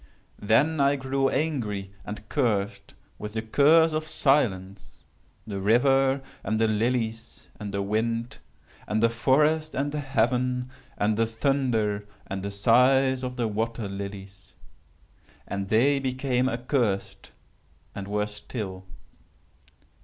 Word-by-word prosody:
"Then 140 Hz, +10 st, +3 dB
I 140 Hz, +1 st, +4 dB
grew 135 Hz, 0 st, 0 dB
angry 110 Hz, -11 st, -2 dB
and 105 Hz, +2 st, -8 dB
cursed, 105 Hz, -8 st, -1 dB, 0.2 s
with 105 Hz, 0 st, -6 dB
the 110 Hz, 0 st, -3 dB
curse 155 Hz, +7 st, +4 dB
of 155 Hz, 0 st, -2 dB
silence, 100 Hz, -11 st, 0 dB, 0.4 s
the 100 Hz, -2 st, -5 dB
river, 135 Hz, +5 st, +3 dB, 0.2 s
and 110 Hz, 0 st, -1 dB
the 115 Hz, -, +3 dB
lilies, 115 Hz, +1 st, -2 dB
and 105 Hz, -2 st, -5 dB
the 100 Hz, 0 st, -2 dB
wind, 115 Hz, +3 st, -2 dB, 0.5 s
and 110 Hz, +1 st, 0 dB
the 115 Hz, -, +4 dB
forest, 150 Hz, +6 st, +2 dB
and 140 Hz, +2 st, -1 dB
the 150 Hz, -, -3 dB
heaven, 125 Hz, -1 st, 0 dB, 0.3 s
and 105 Hz, +1 st, +1 dB
the 115 Hz, 0 st, +2 dB
thunder, 115 Hz, -4 st, 0 dB, 0.2 s
and 95 Hz, 0 st, -5 dB
the 100 Hz, -, -3 dB
sighs 125 Hz, +6 st, +3 dB
of 125 Hz, -1 st, -4 dB
the 120 Hz, -2 st, 0 dB
water 115 Hz, +1 st, -2 dB
lilies. 100 Hz, -1 st, -8 dB, 0.9 s
And 100 Hz, -1 st, -3 dB
they 130 Hz, +7 st, +3 dB
became 130 Hz, -1 st, 0 dB
accursed, 120 Hz, -5 st, -2 dB, 0.6 s
and 100 Hz, -1 st, -6 dB
were 105 Hz, 0 st, 0 dB
still. 105 Hz, -2 st, -7 dB
115 Hz, 125 wpm, -26 LUFS, 105-135 Hz, 0.9 s, I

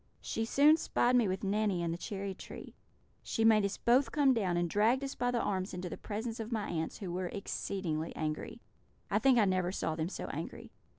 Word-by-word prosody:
She 225 Hz, -, -2 dB
soon 290 Hz, +6 st, +5 dB
spied 250 Hz, -5 st, +2 dB
me 240 Hz, -4 st, +4 dB
with 190 Hz, +2 st, -2 dB
Nanny 200 Hz, -3 st, +1 dB
in 170 Hz, -, -1 dB
the -, -, -2 dB
cherry 195 Hz, 0 st, -4 dB
tree. -, -, -10 dB, 0.5 s
She 225 Hz, -, -1 dB
made 220 Hz, -2 st, +6 dB
us 200 Hz, 0 st, -1 dB
both 255 Hz, +4 st, +3 dB
come 280 Hz, -3 st, +4 dB
down, 190 Hz, -7 st, 0 dB
and 175 Hz, 0 st, +1 dB
dragged 225 Hz, +9 st, +2 dB
us 275 Hz, -, -3 dB
by 245 Hz, -, -1 dB
the 245 Hz, -1 st, +1 dB
arms 190 Hz, -3 st, -2 dB
into 180 Hz, 0 st, -4 dB
the -, -, -5 dB
presence 225 Hz, +2 st, -4 dB
of 225 Hz, +1 st, -5 dB
my 220 Hz, -3 st, -1 dB
aunts, 160 Hz, -1 st, -3 dB
who 190 Hz, -5 st, -5 dB
were 180 Hz, 0 st, -2 dB
exceedingly 175 Hz, -4 st, -3 dB
angry; 155 Hz, -1 st, -4 dB, 0.5 s
I -, -, +3 dB
think 265 Hz, -2 st, +4 dB
I 220 Hz, -, +5 dB
never 185 Hz, -2 st, +1 dB
saw 160 Hz, -4 st, -2 dB
them 160 Hz, +1 st, -2 dB
so -, -, -5 dB
angry. -, -, -6 dB
200 Hz, 220 wpm, -32 LUFS, 180-235 Hz, 0.5 s, made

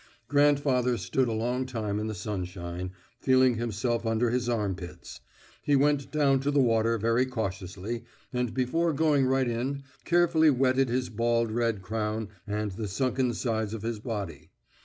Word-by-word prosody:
Grandfather 140 Hz, -3 st, +3 dB
stood 130 Hz, +2 st, 0 dB
a -, -, -1 dB
long 120 Hz, +4 st, -1 dB
time 110 Hz, -5 st, -2 dB
in 105 Hz, -, -2 dB
the 110 Hz, -, -4 dB
sunshine, 90 Hz, -2 st, -4 dB, 0.3 s
feeling 130 Hz, -1 st, +4 dB
himself 115 Hz, +1 st, -1 dB
under 115 Hz, +1 st, +1 dB
his 125 Hz, 0 st, 0 dB
armpits. 95 Hz, -7 st, -4 dB, 0.4 s
He 145 Hz, -, +2 dB
went 140 Hz, 0 st, +2 dB
down 140 Hz, -3 st, +3 dB
to 140 Hz, +2 st, -1 dB
the 145 Hz, 0 st, +2 dB
water 115 Hz, -2 st, +3 dB
very 115 Hz, +4 st, +2 dB
cautiously, 100 Hz, -1 st, -4 dB, 0.3 s
and 125 Hz, -2 st, 0 dB
before 160 Hz, +6 st, +1 dB
going 145 Hz, -3 st, +3 dB
right 130 Hz, -1 st, +2 dB
in, 130 Hz, +4 st, -2 dB, 0.2 s
carefully 170 Hz, -2 st, +4 dB
wetted 130 Hz, -1 st, +3 dB
his 125 Hz, +1 st, -1 dB
bald 115 Hz, 0 st, +1 dB
red 115 Hz, -3 st, 0 dB
crown 110 Hz, +1 st, -2 dB, 0.2 s
and 105 Hz, 0 st, -2 dB
the 105 Hz, +3 st, -4 dB
sunken 125 Hz, +4 st, 0 dB
sides 110 Hz, -3 st, -1 dB
of 110 Hz, -, -7 dB
his 115 Hz, -1 st, -2 dB
body. 105 Hz, -6 st, -5 dB
120 Hz, 160 wpm, -28 LUFS, 110-130 Hz, 0.4 s, feeling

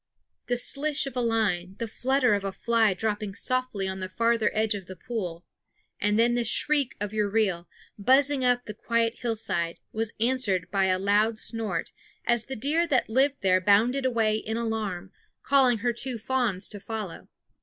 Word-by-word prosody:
The 245 Hz, -, +1 dB
slish 290 Hz, +4 st, +1 dB
of 275 Hz, -, -6 dB
a 250 Hz, -, 0 dB
line, 200 Hz, -6 st, 0 dB
the 230 Hz, -, -3 dB
flutter 255 Hz, +1 st, +1 dB
of 200 Hz, -1 st, 0 dB
a 195 Hz, -, -2 dB
fly 225 Hz, -1 st, +2 dB
dropping 210 Hz, 0 st, -3 dB
softly 255 Hz, -7 st, -1 dB
on 190 Hz, 0 st, -4 dB
the 185 Hz, 0 st, -4 dB
farther 230 Hz, +2 st, +2 dB
edge 215 Hz, 0 st, +1 dB
of 195 Hz, -3 st, -7 dB
the 185 Hz, -, -8 dB
pool 180 Hz, -4 st, -5 dB, 0.5 s
and 210 Hz, +1 st, +1 dB
then 235 Hz, +1 st, +4 dB
the 240 Hz, 0 st, +1 dB
shriek 280 Hz, +4 st, +1 dB
of 205 Hz, +1 st, -4 dB
your 210 Hz, -1 st, 0 dB
reel, 195 Hz, -5 st, 0 dB, 0.3 s
buzzing 270 Hz, +5 st, +3 dB
up 245 Hz, 0 st, +2 dB
the 210 Hz, -, -6 dB
quiet 230 Hz, +1 st, 0 dB
hillside, 215 Hz, -8 st, -2 dB, 0.2 s
was 220 Hz, 0 st, -1 dB
answered 220 Hz, -8 st, 0 dB
by 195 Hz, -1 st, +2 dB
a 185 Hz, -1 st, +2 dB
loud 205 Hz, +3 st, +2 dB
snort, 225 Hz, -1 st, -2 dB, 0.3 s
as 240 Hz, -1 st, +1 dB
the 265 Hz, -, -4 dB
deer 300 Hz, +8 st, +1 dB
that 260 Hz, -8 st, +1 dB
lived 270 Hz, +4 st, +2 dB
there 185 Hz, -1 st, +3 dB
bounded 225 Hz, +8 st, +3 dB
away 225 Hz, -4 st, +1 dB
in 220 Hz, +1 st, -4 dB
alarm, 210 Hz, -5 st, -3 dB, 0.3 s
calling 265 Hz, -4 st, +4 dB
her 240 Hz, -, +2 dB
two 245 Hz, +1 st, -1 dB
fawns 225 Hz, -5 st, -1 dB
to 205 Hz, -, -6 dB
follow. 210 Hz, -3 st, -6 dB
225 Hz, 180 wpm, -27 LUFS, 200-245 Hz, 0.5 s, then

